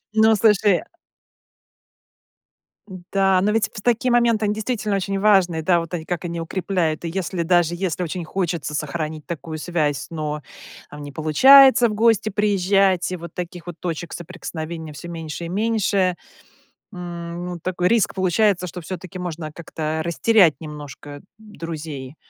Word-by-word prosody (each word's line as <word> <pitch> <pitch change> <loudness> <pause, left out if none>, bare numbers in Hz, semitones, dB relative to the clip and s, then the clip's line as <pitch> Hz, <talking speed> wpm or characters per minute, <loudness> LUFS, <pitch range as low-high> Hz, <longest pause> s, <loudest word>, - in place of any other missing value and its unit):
Ну, 220 0 +5
слушай 205 -3 +3 2.3
Да, 195 -1 +3
но 205 +2 +2
ведь 225 0 +1
в 210 - -7
такие 240 +2 +1
моменты, 235 -3 +3
они 205 - +1
действительно 215 -1 -2
очень 195 0 -2
важные, 190 -5 +3
да, 170 +1 +3
вот 165 +1 -9
они 165 -2 -4
как 175 0 -3
они 170 -1 -4
укрепляют. 170 -2 -2
И 170 - -3
если 180 0 -2
даже, 175 0 +2
если 180 -1 -2
очень 175 0 -3
хочется 170 -4 -3
сохранить 155 0 -4
такую 160 -1 -5
связь, 155 -3 -1
но, 150 -2 -4 0.5
там, 145 - -10
не 145 - -8
получается 245 - +7
в - - -3
гости 220 -1 +3
приезжать, 195 -3 +2
и 185 - -3
вот 170 0 -10
таких 175 0 -7
вот 175 - -6
точек 170 -1 -4
соприкосновения 165 -2 -7
всё 170 +4 -9
меньше 165 0 -6
и 165 - -6
меньше, 200 -3 +1 0.8
м, 175 -1 -6
ну, 180 -1 -5
такой 180 0 -1
риск 230 0 +2
получается, 190 0 +2
что 180 +1 -7
всё-таки 185 +2 -7
можно 165 -3 -5
как-то 160 -1 -4
растерять 170 0 +4
немножко 145 -1 -9 0.2
друзей. 160 -9 -7
175 Hz, 150 wpm, -22 LUFS, 160-200 Hz, 2.3 s, получается